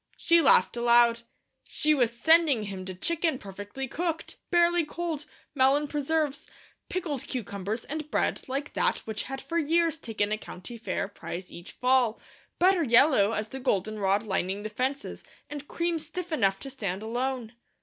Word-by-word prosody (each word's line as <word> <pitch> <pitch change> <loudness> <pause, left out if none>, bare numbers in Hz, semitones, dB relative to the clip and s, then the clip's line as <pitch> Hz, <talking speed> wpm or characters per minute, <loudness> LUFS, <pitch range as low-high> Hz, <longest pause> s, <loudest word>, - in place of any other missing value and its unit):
She 335 0 +4
laughed 275 - +4
aloud. 235 0 +4 0.4
She 305 0 +1
was 245 -6 +2
sending 290 -1 +4
him 195 -2 -6
to 185 -1 -6
chicken 325 - +1
perfectly 205 +6 -7
cooked, 330 +4 -3
barely 345 -1 +4
cold, 320 -1 -4 0.3
melon 280 +2 +3
preserves, 295 0 -1 0.4
pickled 315 -8 -3
cucumbers, 210 -1 -4
and 305 0 -5
bread - - 0
like 275 +3 -3
that - - +2
which 220 -1 -3
had 270 +1 -5
for 335 +5 -2
years 330 +1 +2
taken 210 -2 -2
a 215 - 0
County 225 +6 -9
Fair 210 - -2
prize 185 -2 -7
each 175 - -10
fall; 250 -3 +2 0.4
butter 370 0 +4
yellow 235 -5 +5
as 215 0 -2
the 265 - -6
goldenrod 205 -4 0
lining 195 -1 -2
the 215 - -5
fences, 265 +6 -3 0.3
and 290 -1 -6
cream 340 -1 -1
stiff 335 +3 -5
enough 195 -10 +2
to 270 - -6
stand 200 -6 -4
alone. 245 0 -2
260 Hz, 160 wpm, -28 LUFS, 215-310 Hz, 0.4 s, yellow